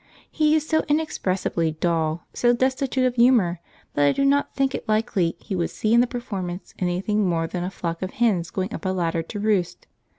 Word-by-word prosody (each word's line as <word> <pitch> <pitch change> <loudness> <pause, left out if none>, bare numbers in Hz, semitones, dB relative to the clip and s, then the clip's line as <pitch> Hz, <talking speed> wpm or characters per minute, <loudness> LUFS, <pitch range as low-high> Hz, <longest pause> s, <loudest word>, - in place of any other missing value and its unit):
He 305 0 +3
is 310 0 0
so 315 0 +2
inexpressibly 190 - 0
dull, 160 0 -1
so 240 0 +3
destitute 260 +1 +1
of 250 - +1
humour, 230 -8 +4 0.3
that 145 - +3
I - - +5
did 275 - +1
not 280 +1 +2
think 270 -1 +1
it - - -6
likely 215 -6 +1
he 200 - -5
would 175 -2 -1
see 215 +1 -1
in 235 - +6
the 245 - +2
performance 195 -7 -5
anything 190 +4 0
more 165 -1 0
than 175 +2 -4
a 180 - -2
flock 170 -3 -4
of 185 - -2
hens 200 -8 +1
going 190 +2 -3
up - - -6
a 190 - 0
ladder 170 -3 0
to 205 +6 -7
roost. 195 -4 0
195 Hz, 205 wpm, -24 LUFS, 175-245 Hz, 0.3 s, in